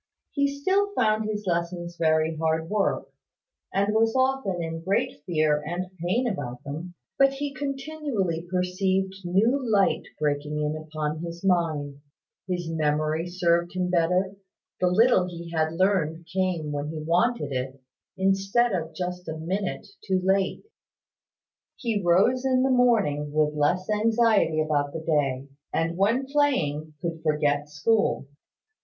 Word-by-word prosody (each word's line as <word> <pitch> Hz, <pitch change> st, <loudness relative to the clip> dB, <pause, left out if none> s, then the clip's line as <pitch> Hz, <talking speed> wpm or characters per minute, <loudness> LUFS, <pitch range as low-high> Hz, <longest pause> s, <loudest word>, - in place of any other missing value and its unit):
He 280 Hz, -1 st, +2 dB
still 380 Hz, +9 st, +1 dB
found 215 Hz, -2 st, +2 dB
his 210 Hz, -1 st, -3 dB
lessons 170 Hz, 0 st, -2 dB
very 160 Hz, -1 st, +2 dB
hard 160 Hz, +1 st, -1 dB
work, 210 Hz, -2 st, 0 dB, 0.6 s
and 200 Hz, +2 st, +1 dB
was 225 Hz, +1 st, +2 dB
often 260 Hz, -8 st, +1 dB
in 165 Hz, -1 st, -4 dB
great 190 Hz, -4 st, -1 dB
fear 155 Hz, -3 st, +2 dB
and 180 Hz, +4 st, -5 dB
pain 230 Hz, +9 st, +1 dB
about 125 Hz, -, -4 dB
them, 160 Hz, +5 st, -6 dB, 0.2 s
but 275 Hz, 0 st, +5 dB
he 280 Hz, +1 st, -4 dB
continually 275 Hz, -, -2 dB
perceived 190 Hz, +1 st, 0 dB
new 220 Hz, +10 st, +2 dB
light 205 Hz, -5 st, +2 dB
breaking 150 Hz, 0 st, -1 dB
in 150 Hz, 0 st, -1 dB
upon 155 Hz, 0 st, -4 dB
his 170 Hz, +2 st, -6 dB
mind: 155 Hz, -6 st, 0 dB, 0.5 s
his 175 Hz, -2 st, -2 dB
memory 155 Hz, +1 st, 0 dB
served 175 Hz, 0 st, +1 dB
him 180 Hz, -1 st, 0 dB
better; 180 Hz, +3 st, +1 dB, 0.4 s
the 180 Hz, -, +3 dB
little 190 Hz, 0 st, +4 dB
he 170 Hz, -1 st, -8 dB
had 160 Hz, -1 st, 0 dB
learned 170 Hz, -3 st, +1 dB
came 180 Hz, -5 st, 0 dB
when 145 Hz, 0 st, -3 dB
he 160 Hz, -, -5 dB
wanted 175 Hz, -, +1 dB
it, 130 Hz, +1 st, -3 dB, 0.4 s
instead 195 Hz, +5 st, +2 dB
of 165 Hz, -4 st, -3 dB
just 180 Hz, 0 st, -4 dB
a 160 Hz, -, -4 dB
minute 185 Hz, +5 st, -3 dB, 0.2 s
too 190 Hz, -1 st, +1 dB
late. 190 Hz, 0 st, +1 dB, 1.1 s
He 225 Hz, -4 st, -1 dB
rose 195 Hz, +9 st, +3 dB
in 260 Hz, -1 st, +2 dB
the 265 Hz, -, +2 dB
morning 210 Hz, -, +2 dB
with 150 Hz, 0 st, +2 dB
less 150 Hz, +5 st, +1 dB
anxiety 215 Hz, -6 st, +3 dB
about 145 Hz, -2 st, 0 dB
the 165 Hz, -, -4 dB
day: 140 Hz, -4 st, 0 dB, 0.2 s
and 165 Hz, +1 st, 0 dB
when 220 Hz, +8 st, +2 dB
playing, 165 Hz, -, 0 dB
could 165 Hz, -1 st, -3 dB
forget 145 Hz, -1 st, +1 dB
school. 175 Hz, +3 st, +1 dB
180 Hz, 140 wpm, -26 LUFS, 155-210 Hz, 1.1 s, but